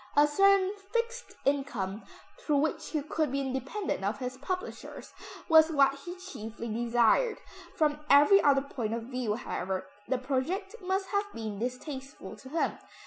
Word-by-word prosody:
A 290 - +8
certain 390 +5 +4 0.2
fixed 470 +1 -2
income, 235 -8 -1 0.4
through 300 - 0
which 315 +2 0
he 305 -3 -2
could 305 -1 -1
be 275 - 0
independent 265 - -3
of 205 +2 -1
his 250 +2 -4
publishers, 365 +8 -6 0.3
was 320 -1 +7
what 275 -3 +4
he 315 +6 -8
chiefly 235 - -7
desired. 235 - +2 0.4
From 300 -1 +2
every 295 +8 +7
other 275 -1 +4
point 230 -5 -3
of 230 - -4
view, 245 -3 -2
however, 190 -5 -3 0.2
the 260 - +1
project 290 - -2
must 380 0 -1
have 405 +1 -1
been 215 -3 -5
distasteful 265 +3 -6
to 260 - -12
him. 325 +3 -1
280 Hz, 150 wpm, -30 LUFS, 245-355 Hz, 0.4 s, A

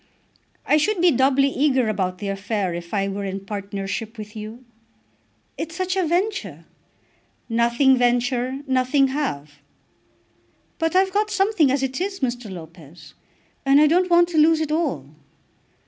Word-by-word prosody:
"I 300 - +4
should 380 +6 0
be 350 0 +5
doubly 270 +1 +3
eager 265 -3 +1
about 185 -3 -2
the 200 0 -5
affair 195 -1 -2
if 170 0 -7
I 195 -1 0
were 200 +1 -4
in 195 0 -5
partnership 200 +2 -5
with 210 0 -9
you." 220 +4 -9 0.9
"It's 330 +1 -5
such 370 0 -2
a 380 - +1
venture." 340 - -2 0.8
"Nothing 235 +3 +3
venture 245 +2 0
nothing 265 +1 +2
have." 150 - -4 1.2
"But 325 +1 -1
I've 380 0 +3
got 420 +1 +1
something 390 -6 +2
as 270 +1 0
it 265 +4 -3
is, 390 +1 -3
Mr. 245 -3 -3
Lopez, 165 -2 -12 0.5
and 275 +1 +5
I 305 - +6
don't 360 +4 +2
want 345 0 +5
to 325 -3 +1
lose 320 +1 +5
it 315 -1 -2
all." 305 - -1
255 Hz, 150 wpm, -22 LUFS, 200-320 Hz, 1.2 s, I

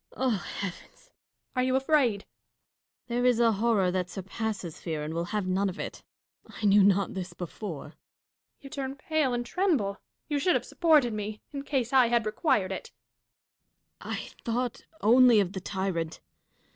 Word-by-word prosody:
Dashkof. - - -18
Oh, 260 0 +2 0.3
heavens! 195 -3 -4
Catharine. - - -24 0.4
Are 255 - +2
you 255 0 +1
afraid? 265 -6 +2
Dashkof. - - -25 0.8
There 240 +1 0
is 245 -2 +4
a 230 -1 +5
horror 210 -3 +2
that 180 -1 -1
surpasses 195 -2 -4
fear, 160 -3 -3
and 155 +1 -4
will 170 +1 -1
have 205 +2 -2
none 190 +2 +1
of 185 - -7
it. - - -5 0.5
I 215 - -5
knew 200 0 +6
not 200 0 +3
this 185 -1 -5
before. 175 -3 -6 0.7
Catharine. - - -42
You 275 - -10
turn 270 -1 -4
pale 295 -2 0
and 240 0 -2
tremble. 265 - 0 0.3
You 295 -2 0
should 360 +6 +3
have - - 0
supported 300 -9 +3
me, 210 0 -4
in 280 - -3
case 270 -3 -1
I 255 -2 +6
had 235 -1 +2
required 215 - +1
it. 190 - -6 1.1
Dashkof. - - -7
I - - -7
thought 240 +1 -2 0.2
only 240 +1 +7
of 195 -2 0
the 190 - -4
tyrant. 180 -4 -3
215 Hz, 180 wpm, -28 LUFS, 190-255 Hz, 1.1 s, only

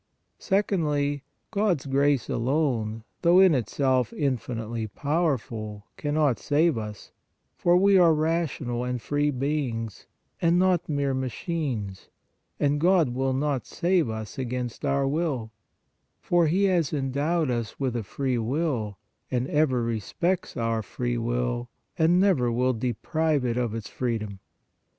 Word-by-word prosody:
Secondly, 150 -8 0 0.3
God 200 -8 +1
s - - -14
grace 140 -1 +2
alone, 120 -4 0 0.2
though 175 +2 +6
in 190 -3 +7
itself 130 +1 +1
infinitely 120 - -2
powerful, 115 -7 -2
cannot 145 -3 +1
save 155 +2 +2
us, 105 -2 -7 0.4
for 175 0 +3
we 195 +1 +5
are 170 -2 +6
rational 155 -6 0
and 125 0 -2
free 145 +4 0
beings, 130 - -2 0.3
and 170 +1 +4
not 185 -2 +2
mere 140 -2 0
machines, 130 - -3 0.5
and 145 0 +1
God 175 -4 +4
will 130 +2 0
not 135 -1 -1
save 175 -6 +1
us 110 +4 -6
against 125 -2 -4
our 140 0 +1
will, 140 -7 -1 0.7
for 175 -2 +2
He 185 +6 +2
has 180 -6 +2
endowed 145 +2 0
us 115 -2 -3
with 130 -3 -1
a 120 - 0
free 125 +3 -2
will 120 - -1 0.3
and 125 0 -1
ever 140 -5 +2
respects 170 - -2
our 115 -1 0
free 120 +3 -3
will 120 +1 -1 0.3
and 170 +2 +4
never 175 -12 +3
will 125 +2 +2
deprive 130 +5 0
it 120 -1 0
of 120 -3 -1
its 110 -2 -5
free 120 -1 -1
dom. 105 -3 -7
135 Hz, 135 wpm, -26 LUFS, 120-160 Hz, 0.7 s, in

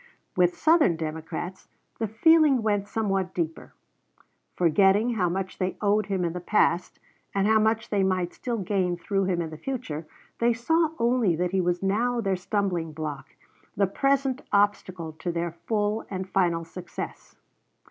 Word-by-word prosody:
With 180 -1 +3
Southern 310 - +4
Democrats 160 +3 -5 0.3
the 225 - 0
feeling 280 +3 +4
went 205 -2 0
somewhat 195 -4 -1
deeper. 165 -2 -3 0.8
Forgetting 195 +7 +4
how 180 -6 +1
much 185 +1 -4
they 185 0 -1
owed 210 0 +2
him 190 -3 0
in 170 - -2
the 180 - -4
past, 175 -2 +1 0.4
and 195 0 +2
how 220 +1 +4
much 220 +1 +1
they 205 -2 +2
might 185 -2 0
still 240 -2 -3
gain 185 -3 0
through 195 +2 -1
him 175 -2 0
in 160 - -6
the 155 - -8
future, 170 - -5 0.3
they 235 0 +3
saw 320 +8 +2
only 235 -6 +2
that 175 +2 -1
he 190 -1 +2
was 175 +1 -1
now 235 +5 +1
their 195 -4 0
stumbling 180 -4 -2
block, 150 -3 -6 0.4
the 200 - +4
present 275 +5 +1
obstacle 190 -5 +1
to 175 - -2
their 170 0 -2 0.2
full 210 0 0
and 190 -1 -4
final 175 -3 +1
success. 175 +1 -8
195 Hz, 160 wpm, -26 LUFS, 175-220 Hz, 0.8 s, Southern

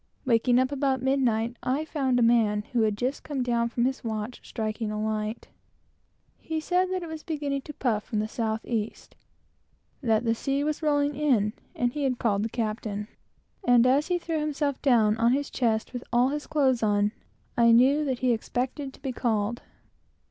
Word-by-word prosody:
Waking 245 0 +3
up 260 +2 +2
about 270 -2 0
midnight, 240 -3 +1
I 270 +5 -1
found 270 -5 0
a 245 - +3
man 220 -3 +3
who 240 - +3
had 215 -2 +1
just 255 +5 -2
come 275 -4 -3
down 235 -1 +1
from 235 0 0
his 265 +1 -2
watch, 220 +1 -4
striking 220 -1 -3
a 210 0 -3
light. 215 +1 -3 0.9
He 320 -1 -3
said 360 +4 +1
that 370 -1 -2
it - - -6
was 320 -1 -6
beginning 290 -4 -3
to 295 - -9
puff 240 -5 +1
up 210 - -8
from 220 - -2
the 215 +1 0
south 220 -1 -2
east, 225 -2 -4 0.9
and 250 - -3
that 220 +1 +3
the 225 - +3
sea 275 +4 -1
was 305 +1 -2
rolling 290 -1 +2
in, 245 -8 +2 0.2
and 245 0 0
he 295 - -2
had 260 -2 0
called 205 -4 +1
the 225 - -1
captain; 215 -2 -3 0.5
and 245 -6 +5
as 270 +4 +3
he 360 -1 +1
threw 330 -2 -2
himself 295 -2 -1
down 225 -6 +4
on 230 +2 +3
his 285 +1 -1
chest 225 -1 0
with 245 0 -5
all 245 +2 +4
his 295 +1 -4
clothes 265 -5 +2
on, 205 -1 +2 0.4
I 235 -1 +5
knew 265 +6 +5
that 260 -3 -2
he 250 - +4
expected 255 +4 -2
to - - -22
be 270 - -2
called. 230 -1 -1
245 Hz, 200 wpm, -27 LUFS, 225-280 Hz, 0.9 s, and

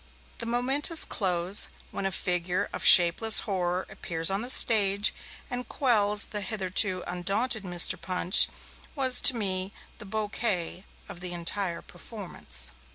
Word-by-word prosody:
The 230 - -6
momentous 270 +7 +1
close, 185 0 0 0.2
when 195 - -5
a - - -6
figure 180 -1 -4
of - - -7
shapeless 180 +6 +5
horror 180 -2 -4
appears 165 +1 -3
on 195 +2 -3
the 245 - -7
stage, 205 -4 +6 0.3
and 245 0 -8
quells 210 -6 +2
the 210 - -5
hitherto 190 -1 0
undaunted 200 +7 -3
Mr. 175 -3 0
Punch, 185 0 +1 0.5
was 260 -3 +3
to 260 - +7
me 190 -3 -3 0.3
the 230 - -11
bouquet 205 -3 -5 0.2
of - - -12
the 180 0 -5
entire 175 +1 -5
performance. 175 - -9
195 Hz, 135 wpm, -25 LUFS, 180-220 Hz, 0.5 s, to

